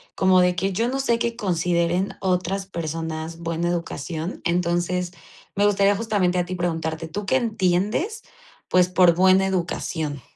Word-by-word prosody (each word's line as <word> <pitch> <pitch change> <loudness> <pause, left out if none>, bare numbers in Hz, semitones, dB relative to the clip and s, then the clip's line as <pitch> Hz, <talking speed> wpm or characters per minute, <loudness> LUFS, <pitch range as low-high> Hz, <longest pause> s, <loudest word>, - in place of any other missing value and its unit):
como 190 -1 +4
de 180 0 +2
que 195 +2 0
yo 225 +6 0
no 265 +2 -2
sé 235 -3 +1
qué 235 0 -1
consideren 175 -1 0
otras 190 +1 -1
personas 165 -2 -5
buena 170 0 -2
educación. 170 0 -4
Entonces, 175 +1 0 0.4
me 205 +1 +3
gustaría 200 0 +3
justamente 200 -4 0
a 175 - 0
ti 185 +1 -5
preguntarte, 165 -2 -2
¿tú 205 +5 -5
qué 195 - +1
entiendes? 225 - 0 0.5
Pues, 180 -1 +4
por 180 -2 +5
buena 190 +2 +4
educación. 170 -5 -2
180 Hz, 150 wpm, -23 LUFS, 170-195 Hz, 0.5 s, por